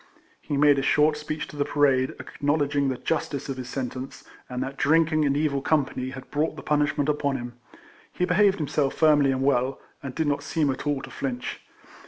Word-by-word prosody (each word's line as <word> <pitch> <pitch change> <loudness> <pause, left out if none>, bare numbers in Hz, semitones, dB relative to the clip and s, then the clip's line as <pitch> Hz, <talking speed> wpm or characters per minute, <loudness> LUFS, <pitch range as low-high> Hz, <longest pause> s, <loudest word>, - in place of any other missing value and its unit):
He 145 - -3
made 145 -1 +5
a - - 0
short 150 +3 +3
speech 150 0 -5
to - - -11
the 145 - +1
parade, 135 -3 +2
acknowledging 145 -1 0
the 130 - -2
justice 145 -2 -2
of 135 - -3
his 125 -1 -6
sentence, 130 0 -5 0.3
and 125 0 -2
that 135 +1 -6
drinking 155 +1 +3
and 140 0 +1
evil 145 -2 0
com 150 0 +2
pany 130 0 -5
had 130 - -10
brought 150 +2 0
the - - -9
punishment 145 -1 +1
upon 145 -2 0
him. 120 -1 -7 0.6
He 180 - 0
behaved 195 +2 +3
himself 145 -2 0
firmly 150 -3 +4
and 130 0 -1
well, 135 -1 +1 0.2
and 135 -2 -7
did 160 - 0
not 145 -1 0
seem 145 0 0
at 135 +2 -5
all 145 -2 0
to - - -9
flinch. 125 -3 -4
145 Hz, 205 wpm, -25 LUFS, 135-150 Hz, 0.6 s, made